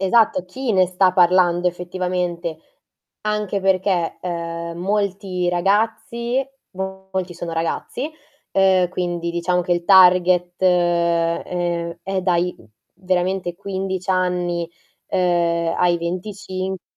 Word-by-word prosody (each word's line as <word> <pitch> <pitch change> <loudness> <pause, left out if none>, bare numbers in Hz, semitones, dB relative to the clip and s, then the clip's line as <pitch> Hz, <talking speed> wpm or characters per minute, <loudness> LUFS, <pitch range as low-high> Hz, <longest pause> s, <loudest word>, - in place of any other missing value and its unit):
Esatto, 195 -2 +3
chi 255 +5 -3
ne 185 -1 +4
sta 185 +1 +3
parlando 180 -1 +4
effettivamente. 175 -2 -3 0.7
Anche 210 -2 -1
perché, 185 -2 +1
ehm, 170 -1 -4
molti 195 -2 -1
ragazzi, 225 +7 0 0.3
molti 190 -1 -5
sono 170 0 -5
ragazzi, 165 - -3 0.4
ehm, 190 -2 +4
quindi 175 -1 -2
diciamo 175 +1 0
che 180 0 0
il 175 0 -1
target, 180 -2 +5
ehm, 170 -1 +1
è 195 +3 -5
è 190 - 0
dai 180 -1 +1 0.4
veramente 185 0 -1
15 190 -1 -4
anni, 180 -2 0 0.4
ehm, 170 -2 +1
ai 175 -1 +3
25 185 +1 -4
180 Hz, 105 wpm, -21 LUFS, 175-190 Hz, 0.7 s, target